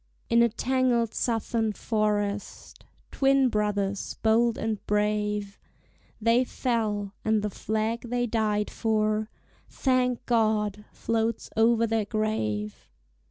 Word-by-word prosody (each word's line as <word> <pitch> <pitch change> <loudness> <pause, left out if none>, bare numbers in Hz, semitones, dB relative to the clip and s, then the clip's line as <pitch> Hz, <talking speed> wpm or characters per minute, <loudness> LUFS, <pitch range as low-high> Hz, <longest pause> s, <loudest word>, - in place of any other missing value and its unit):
In 235 0 +5
a 235 - +5
tangled 245 -1 +1
Southern 225 -1 -1
forest, 205 -2 -2 0.3
Twin 270 -1 +3
brothers 205 -2 -1
bold 225 +1 +3
and 220 -2 -3
brave, 210 -1 -1 0.6
They 230 +3 +3
fell; 215 -6 -2
and 220 -1 +1
the 210 - -2
flag 220 +4 -2
they 245 0 0
died 215 -2 0
for, 215 -1 0 0.4
Thank 250 -2 0
God! 215 -3 +1
floats 230 0 -2
over 230 +1 +4
their 225 -1 0
grave. 105 - -2
220 Hz, 110 wpm, -27 LUFS, 210-235 Hz, 0.6 s, In